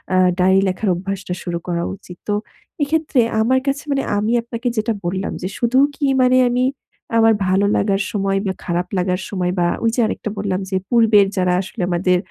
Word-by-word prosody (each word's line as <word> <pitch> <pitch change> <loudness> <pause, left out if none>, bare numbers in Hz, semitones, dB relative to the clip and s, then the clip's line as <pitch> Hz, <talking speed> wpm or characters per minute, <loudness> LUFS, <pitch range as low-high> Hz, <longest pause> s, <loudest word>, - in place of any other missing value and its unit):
আ - - +4 0.2
diary 190 +1 +4
লেখার 190 +3 -1
অভ্যাসটা 195 +1 -4
শুরু 175 -2 -3
করা 170 -1 -1
উচিত। 180 -2 -13
তো 205 - 0 0.5
এক্ষেত্রে 300 -2 +1 0.2
আমার 255 +4 +3
কাছে 275 +1 -1
মানে 275 -1 +1
আমি 215 +3 0
আপনাকে 235 +1 -5
যেটা 220 +1 +1
বললাম 190 +3 -2
যে 185 - -2
শুধু 240 +2 +1 0.2
কি 290 - -1 0.2
মানে 255 0 +4
আমি 250 +1 +1 0.5
আমার 225 0 +5
ভালো 190 +2 +2
লাগার 200 -1 +1
সময় 195 -1 0
বা 190 - -1
খারাপ 175 0 -1
লাগার 180 0 0
সময় 180 -3 -1
বা 175 - +3 0.2
ওই 230 - +3
যে - - -2
আরেকটা 215 - -3
বললাম 195 -2 -1
যে 190 - -2
পূর্বের 225 -4 +5
যারা 180 -1 +2
আসলে 190 -1 -7
আমাদের 180 +1 +2
195 Hz, 190 wpm, -19 LUFS, 185-230 Hz, 0.5 s, আমার